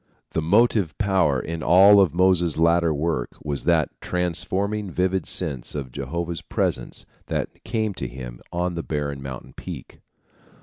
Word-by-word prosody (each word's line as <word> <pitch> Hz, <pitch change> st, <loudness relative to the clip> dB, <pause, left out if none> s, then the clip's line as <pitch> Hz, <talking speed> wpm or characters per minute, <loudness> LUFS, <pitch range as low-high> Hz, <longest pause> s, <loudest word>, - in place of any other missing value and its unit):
The 80 Hz, -, 0 dB
motive 100 Hz, 0 st, +3 dB
power 95 Hz, -10 st, +2 dB
in 85 Hz, +3 st, -5 dB
all 100 Hz, +5 st, +7 dB
of 95 Hz, -6 st, +3 dB
Moses' 90 Hz, -3 st, +3 dB
later 85 Hz, 0 st, +3 dB
work 75 Hz, -4 st, -2 dB
was 70 Hz, -2 st, -3 dB
that -, -, +3 dB
transforming, 95 Hz, +4 st, -1 dB
vivid 95 Hz, +1 st, 0 dB
sense 75 Hz, -9 st, -3 dB
of 70 Hz, -4 st, -4 dB
Jehovah's 85 Hz, +6 st, -4 dB
presence -, -, -2 dB, 0.2 s
that -, -, -4 dB
came 110 Hz, -2 st, -1 dB
to -, -, -3 dB
him -, -, -8 dB
on 90 Hz, +1 st, -1 dB
the 85 Hz, -, -3 dB
barren 70 Hz, -3 st, -3 dB
mountain 65 Hz, -2 st, -8 dB
peak. -, -, -9 dB
85 Hz, 145 wpm, -24 LUFS, 75-95 Hz, 0.2 s, all